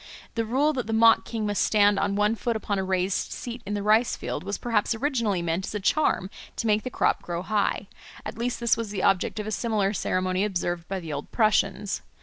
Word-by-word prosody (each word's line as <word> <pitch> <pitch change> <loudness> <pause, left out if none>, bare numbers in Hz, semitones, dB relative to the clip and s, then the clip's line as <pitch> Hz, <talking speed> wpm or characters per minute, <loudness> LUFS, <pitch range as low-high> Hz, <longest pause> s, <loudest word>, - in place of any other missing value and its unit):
The 230 -1 -1
rule 275 +7 +2
that 250 -5 -3
the 225 - -2
mock 225 0 +5
king 225 -2 -3
must 205 -1 0
stand 205 -1 +4
on 200 0 0
one 210 +1 +2
foot 230 +1 -2
upon 205 -2 -2
a - - 0
raised 185 0 -1
seat 240 0 -6
in 205 - -2
the 205 - -2
rice 220 +3 +3
field - - -4
was 200 +2 -3
perhaps 230 -1 0
originally 225 - 0
meant 170 +3 -1
as - - -5
a - - -1
charm 205 -4 +1 0.2
to - - -3
make 215 -1 +3
the 255 - -5
crop - - +1
grow 175 0 -4
high; 205 -1 0 0.4
at - - -5
least 240 +2 -2
this 235 -1 +3
was 230 -2 -4
the 200 -2 -3
object 195 +2 +2
of 210 - -3
a 215 - -4
similar 215 -2 0
ceremony 185 -1 0
observed 175 -4 -2
by 195 -1 -3
the 165 -4 -6
old 145 0 -6
Prussians. 215 -2 +1
210 Hz, 230 wpm, -26 LUFS, 190-230 Hz, 0.4 s, mock